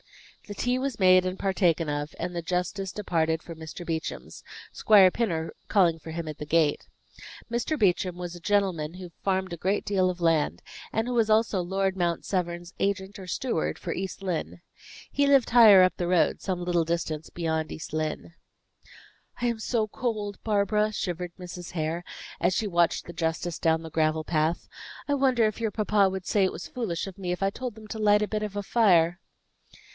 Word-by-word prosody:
The 205 - -7
tea 245 +4 0
was 265 -4 -3
made 185 -1 +6
and 185 +1 -3
partaken 180 -4 +1
of, 145 +1 -3
and 175 +1 -4
the 170 - -2
justice 180 +3 -2
departed 160 -5 0
for 170 - -8
Mr. 160 +2 -8
Beauchamp's, 160 -1 -5 0.3
Squire 200 -4 +6
Pinner 165 -9 -2 0.2
calling 175 -5 +4
for 160 - -10
him 165 0 -5
at 155 -1 -7
the 150 - -5
gate. 155 -1 +1 0.6
Mr. 240 +6 -1
Beauchamp 180 -2 +1
was 175 -1 -6
a - - -9
gentleman 185 -5 0
who 180 -2 -9
farmed 190 -2 0
a - - -5
great 190 +5 -1
deal 190 -2 +2
of 180 -1 -4
land, 165 -3 +1 0.3
and 225 +2 -1
who 250 - -2
was 230 -2 +2
also 215 -3 +3
Lord 190 +2 -1
Mount 175 -2 -1
Severn's 175 -2 -3
agent 195 +1 -1
or 185 - -9
steward 235 -3 -1
for - - -4
East 190 +1 -5
Lynne. 180 -2 -3 0.5
He 285 0 +1
lived 275 -4 +4
higher 215 -6 +9
up 185 - +2
the 175 - -2
road 180 -1 +2
some 180 -2 -3
little 175 -1 +2
distance 160 -2 -3
beyond 160 -2 -2
East 155 - -8
Lynne. 155 +1 -3 1.1
"I 245 - -1
am 235 -2 0
so 220 -1 0
cold, 210 -3 -3
Barbara," 210 0 +1
shivered 180 -3 -3
Mrs. 180 -1 -8
Hare, 165 +1 -2 0.4
as 175 +2 +3
she 220 - 0
watched 175 -3 +1
the 170 - -9
justice 165 0 -2
down 160 0 +2
the 160 - -8
gravel 155 0 +1
path. 160 +1 0 0.4
"I 285 - +1
wonder 260 -4 +3
if 215 +1 -2
your 220 -2 0
papa 210 -2 +2
would 190 -1 -5
say 205 - +2
it 190 - +2
was - - -7
foolish 210 -10 -3
of 195 0 -10
me, 180 -2 -3
if 180 +2 -2
I 195 - +2
told 250 0 -5
them 220 -1 -12
to 220 - -6
light 210 0 +4
a - - -1
bit 215 0 -2
of 210 -2 -4
fire?" 175 -7 +3
185 Hz, 195 wpm, -27 LUFS, 170-210 Hz, 1.1 s, higher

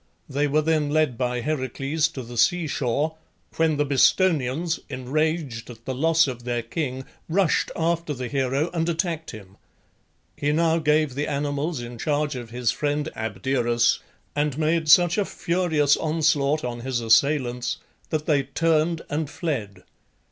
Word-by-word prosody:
They 145 +1 0
were 150 +2 +2
then 155 -2 +1
led 155 -4 +2
by 125 0 -1
Heracles 140 +2 -1
to 130 - -5
the 120 +1 -9
sea 175 +8 +3
shore, 145 +3 -1 0.4
when 160 -2 +2
the 145 - +2
Bistonians, 155 +2 +2
enraged 140 -1 -2
at 115 -1 -12
the 130 - -2
loss 165 +5 +3
of 125 -3 -5
their 120 -1 -2
king, 130 +1 -4 0.2
rushed 180 +1 +2
after 170 -1 0
the 130 -3 -4
hero 135 +5 0
and 165 0 0
attacked 165 -2 -2
him. 100 -3 -11 0.8
He 145 - 0
now 165 +1 +2
gave 155 -2 +2
the 145 +3 -2
animals 145 +1 -2
in 120 -1 -8
charge 150 0 0
of 120 -2 -7
his 120 -1 0
friend 145 +3 -1
Abderus, 120 +2 +1 0.4
and 145 -1 0
made 160 0 +1
such 175 +4 +6
a - - +3
furious 170 -6 +1
onslaught 155 -2 +1
on 120 -1 -4
his 125 0 -2
assailants 125 +2 +2 0.3
that 155 -1 -2
they 145 -4 +3
turned 160 +3 +1
and 150 0 -2
fled. 130 - -4
145 Hz, 155 wpm, -24 LUFS, 125-160 Hz, 0.8 s, such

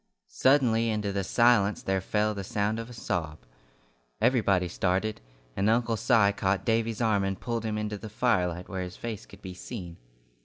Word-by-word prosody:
Suddenly 120 -4 +3
into 105 -2 -1
the 100 0 -1
silence 110 -1 +3
there 95 0 0
fell 105 +3 0
the 100 -1 -5
sound 105 +3 -1
of 115 +1 -6
a - - -10
sob. 80 -8 -3 0.8
Everybody 100 -8 +2
started, 95 +5 -1 0.3
and 100 +2 +1
Uncle 115 0 +2
Si 100 -1 +4
caught 95 -1 0
Davy's 115 0 0
arm 110 -4 +2
and 95 0 -2
pulled 115 -2 -3
him 110 -1 -2
into 105 -1 -3
the 110 - -8
firelight 90 -6 0
where 95 -1 -4
his 90 0 -6
face 110 -3 -6
could 100 0 -16
be 95 -2 -6
seen. 90 -3 -8
105 Hz, 180 wpm, -28 LUFS, 95-115 Hz, 0.8 s, Si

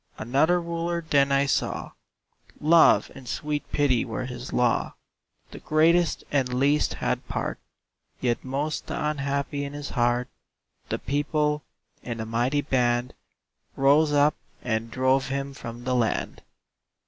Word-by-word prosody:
Another 140 +10 +2
Ruler 170 0 -3
then 140 -2 +3
I 140 0 +3
saw 140 - -1 0.7
Love 160 +2 +5
and 130 - -12
sweet 150 +5 -3
Pity 135 -5 +2
were 125 +1 -4
his 125 0 -7
law: 120 -1 +1 0.6
The - - -9
greatest 165 +2 +2
and 135 -3 +2
the 125 - -4
least 145 +3 +2
had - - -2
part - - -3 0.6
(Yet 120 -2 -1
most 140 +4 -3
the - - -4
unhappy) 140 -1 -2
in 140 0 -5
his 145 -1 -6
heart 120 0 +1 0.6
The - - -1
People, 150 +1 0 0.4
in 115 -2 -5
a 110 - -3
mighty 120 +6 0
band, 125 -3 0 0.6
Rose 145 +3 +4
up, 145 +1 +4 0.3
and 115 -1 -1
drove 130 +2 +1
him 140 +1 -3
from 120 -2 -8
the 130 0 -1
land! 120 -3 -1
140 Hz, 140 wpm, -26 LUFS, 125-150 Hz, 0.7 s, Love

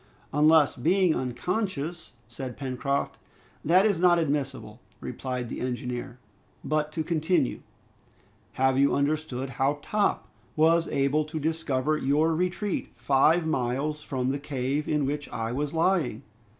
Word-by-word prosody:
"Unless, 150 -1 +5
being 180 +5 +3
unconscious 170 - -3
" - - -33
said 125 +2 -7
Pencroft. 140 +1 -2 0.4
"That 180 +6 +5
is 200 -6 +2
not 175 -1 +5
admissible," 140 -4 -2 0.2
replied 125 -2 -4
the - - -6
engineer. 125 0 -4 0.5
"But 155 0 -1
to 160 - -1
continue. 160 -3 0 0.9
Have 130 0 +2
you 140 0 +4
understood 140 -3 -1
how 140 +2 +2
Top 210 -1 0 0.3
was 165 +2 +4
able 140 +2 +1
to 155 +1 -5
discover 155 -2 0
your 150 +4 +2
retreat 180 +4 -2
five 140 +7 +3
miles 150 +1 -1
from 130 -3 -2
the 140 - -2
cave 140 +1 -2
in 150 -2 +1
which 145 +1 -3
I 115 0 -3
was 140 +3 -2
lying?" 165 - +1
150 Hz, 135 wpm, -27 LUFS, 130-160 Hz, 0.9 s, Unless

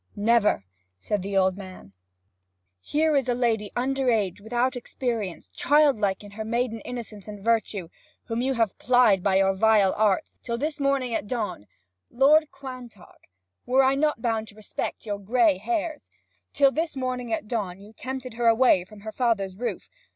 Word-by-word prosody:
'Never!' 210 - +2 0.3
said 200 - -2
the 195 +1 -2
old 190 -1 +3
man. 185 - -11 0.9
'Here 305 - +1
is 270 -3 +1
a 245 - +2
lady 225 -4 0
under 265 +1 0
age, 205 -4 0
without 245 +4 0
experience 230 -6 -4
child 290 -4 +3
like 195 -1 0
in 205 - -11
her 220 +2 -6
maiden 235 0 -1
innocence 225 -4 -8
and 210 -1 -8
virtue 215 -4 0 0.4
whom 230 0 -3
you 265 +1 0
have 225 -4 +1
plied 245 -6 +4
by 195 0 +1
your 195 0 +4
vile 205 -1 +4
arts, 205 -3 0
till 235 -1 -3
this 295 +4 -3
morning 275 -3 0
at 215 - -2
dawn 210 - -4 0.2
' 95 0 -56
'Lord 295 +5 +4
Quantock, 255 -7 -11 0.4
were 260 +2 +4
I 265 +1 +4
not 295 -3 0
bound 225 -2 0
to 205 - -13
respect 215 +1 -5
your 205 -2 -3
gray 215 -1 +2
hairs 320 - -3 0.2
' - - -45
'Till 275 -1 +4
this 315 +1 -2
morning 255 -2 -3
at 215 -1 -2
dawn 200 -6 -3
you 205 +2 -14
tempted 255 +1 -6
her 235 +1 0
away 230 -5 +5
from 205 +2 -15
her 220 +1 -6
father's 215 -6 0
roof. 240 +5 -4
230 Hz, 180 wpm, -25 LUFS, 205-255 Hz, 0.9 s, away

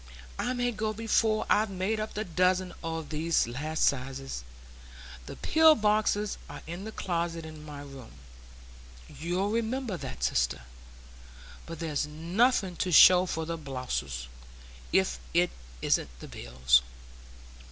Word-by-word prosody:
I 250 - 0
may 245 -1 0
go 215 -1 -2
before 220 0 +1
I've 215 +1 +3
made 195 +3 -1
up 215 0 -4
the 215 - -1
dozen 185 0 +1
o' 165 0 -3
these 155 -1 0
last 155 +6 -2
sizes. 135 - -2 0.8
The - - -7
pill 320 0 +5
boxes 210 -1 +1
are - - -9
in 175 +5 -6
the 220 - -6
closet 170 -4 -2
in 155 -1 -10
my 145 -2 -8
room,—you'll 60 - -7
remember 230 -2 -1
that, 60 - -7
sister,—but - - -5
there's 150 -2 -2
nothing 180 +6 +1
to 185 - -1
show 180 +3 +8
for 160 -2 -2
the 165 0 -4
boluses, 70 - -4 0.6
if 65 -1 +2 0.2
it - - +3 0.3
isn't - - +2
the - - -9
bills." 60 0 +2
160 Hz, 130 wpm, -29 LUFS, -, 0.8 s, show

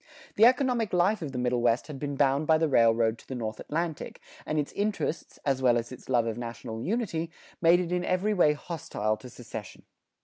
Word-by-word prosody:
The 220 - +6
economic 250 -4 +1
life 185 +4 +2
of 150 -4 -4
the 130 - -5
Middle 125 -1 0
West 120 +1 +2
had 145 -3 -8
been 145 0 -3
bound 140 +2 +2
by 160 - +5
the 160 0 +1
railroad 115 -3 +3
to - - -18
the 130 - -5
North 110 -3 -4
Atlantic, 165 0 -4 0.3
and 155 - -1
its 145 -1 -1
interests, 205 -5 -2
as 135 -2 +1
well 120 -2 +4
as 115 +1 -4
its 130 - -11
love 120 -3 +3
of 115 0 -3
national 115 -1 -6
unity, 175 - -2 0.3
made 170 +1 +6
it 175 -1 -3
in 180 0 0
every 185 +4 +1
way 175 -6 +4
hostile 145 - -3
to 125 - -11
secession. 115 -4 -9
145 Hz, 210 wpm, -28 LUFS, 120-175 Hz, 0.3 s, The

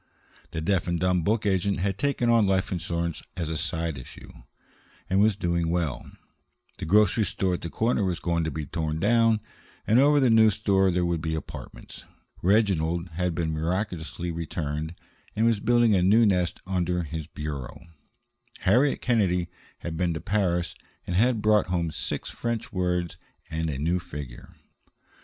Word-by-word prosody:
The 80 - -4
deaf 90 0 0
and 85 -1 0
dumb 90 0 +2
book 105 +6 0
agent 100 0 +1
had 95 +1 -1
taken 140 -4 0
on 115 -3 +4
life 95 -1 +1
insurance 85 -2 -2 0.2
as 85 -3 -2
a 80 - -2
side 80 -3 -2
issue, 60 - -12 0.8
and 95 - +2
was 105 -1 +4
doing 85 -3 0
well; 80 -8 -2 0.7
the - - -4
grocery 105 +4 +4
store 95 -1 -1
at 90 - -3
the 85 - -5
corner 110 +3 0
was 90 -3 0
going 85 -1 0
to - - -1
be 80 -2 -4
torn 80 -1 -3
down, 115 +2 +3 0.4
and 115 +4 +4
over 145 +2 +5
the 130 -4 +4
new 110 -1 +6
store 100 -2 +2
there 90 0 +1
were 85 -1 0
to - - -7
be 80 0 -2
apartments; 80 - -9 0.4
Reginald 90 -4 +2
had 90 +1 -2
been 80 -2 -1
miraculously 85 0 -3
returned, 80 -1 -4 0.4
and 110 - +2
was 115 -3 +3
building 120 0 +3
a 95 - +3
new 105 +6 +5
nest 90 -4 +1
under 90 -2 -1
his 80 -1 -5
bureau; 75 -5 -6 0.8
Harriet 125 +9 +3
Kennedy 95 -8 +1 0.3
had 80 -2 -5
been 85 -1 0
to - - -3
Paris, 90 -4 0 0.3
and 90 - -3
had 115 +2 +2
brought 105 -1 +4
home 85 -2 -1
six - - -4
French 115 -1 -4
words 90 -2 -1 0.3
and 80 0 -1
a 70 - -3
new 85 +6 0
figure. 75 -6 -9
90 Hz, 170 wpm, -26 LUFS, 80-105 Hz, 0.8 s, new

